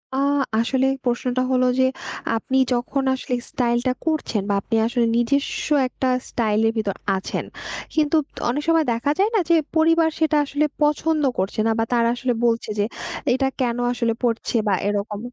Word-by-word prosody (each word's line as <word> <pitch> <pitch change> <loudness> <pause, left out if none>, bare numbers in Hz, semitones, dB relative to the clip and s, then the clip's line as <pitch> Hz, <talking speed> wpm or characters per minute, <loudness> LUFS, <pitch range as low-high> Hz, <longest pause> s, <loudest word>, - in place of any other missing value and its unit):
আ - - -1 0.4
আসলে 260 +3 +1 0.2
প্রশ্নটা 250 +1 0
হল, 255 -1 +3 0.2
যে 260 - +5 0.5
আপনি 265 +4 -1 0.2
যখন 255 +3 -1
আসলে 255 -1 -3
স্টাইলটা 240 +1 0
করছেন, 310 -9 0
বা - - +2
আপনি 225 - -2
আসলে 240 -1 +1
নিজস্ব 275 +4 0 0.2
একটা 260 - -3 0.2
স্টাইলের 225 -1 +1
ভিতর 205 -3 -1 0.2
আছেন, 190 - -4 0.5
কিন্তু 305 0 +2 0.3
অনেক 290 +4 -1
সময় 330 -2 +3
দেখা 235 +5 0
যায় 405 +2 +4
না? - - +4
যে 335 - +6 0.2
পরিবার 325 0 +4
সেটা 315 -1 +2
আসলে 290 +2 0 0.2
পছন্দ 300 +1 +2 0.2
করছে 190 +3 -2
না, 225 - +3
বা 225 - +3
তারা 235 -1 +3
আসলে 245 0 -1
বলছে, 230 -1 +1
যে 205 - +3 0.5
এটা 265 +1 +1
কেনো 245 -1 0
আসলে 235 -2 0
পড়ছে, 230 0 -1
বা 200 - +3
এরকম? 205 0 -2
250 Hz, 165 wpm, -22 LUFS, 230-290 Hz, 0.5 s, যে